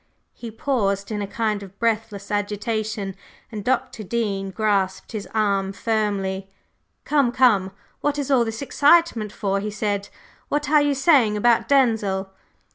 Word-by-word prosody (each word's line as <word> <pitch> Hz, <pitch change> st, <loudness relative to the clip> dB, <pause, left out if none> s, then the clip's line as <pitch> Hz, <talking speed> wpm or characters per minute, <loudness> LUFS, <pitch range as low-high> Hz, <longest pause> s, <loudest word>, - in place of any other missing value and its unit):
He 235 Hz, -, -8 dB
paused 215 Hz, -4 st, -1 dB
in 210 Hz, -1 st, -2 dB
a 200 Hz, -, -3 dB
kind 215 Hz, -1 st, -1 dB
of 195 Hz, 0 st, -12 dB
breathless 220 Hz, -3 st, -2 dB
agitation, 210 Hz, -1 st, -2 dB, 0.4 s
and 210 Hz, -2 st, -5 dB
Dr. 250 Hz, -1 st, -1 dB
Dean 200 Hz, -2 st, -2 dB
grasped 195 Hz, -1 st, -1 dB
his 215 Hz, -3 st, -5 dB
arm 200 Hz, -3 st, 0 dB
firmly. 195 Hz, -3 st, -1 dB, 0.6 s
"Come, 280 Hz, -5 st, +2 dB
come, 230 Hz, -7 st, +3 dB, 0.3 s
what 290 Hz, 0 st, -1 dB
is 285 Hz, -1 st, -2 dB
all 255 Hz, -3 st, +5 dB
this 225 Hz, +3 st, -4 dB
excitement 285 Hz, -, +3 dB
for?" 200 Hz, -2 st, -1 dB
he 210 Hz, +2 st, -3 dB
said. 205 Hz, -1 st, -2 dB, 0.4 s
"What 295 Hz, 0 st, -1 dB
are 300 Hz, -1 st, +6 dB
you 290 Hz, -1 st, +1 dB
saying 265 Hz, -7 st, +4 dB
about 235 Hz, +2 st, +3 dB
Denzil?" 215 Hz, -8 st, +2 dB
215 Hz, 145 wpm, -23 LUFS, 200-240 Hz, 0.6 s, are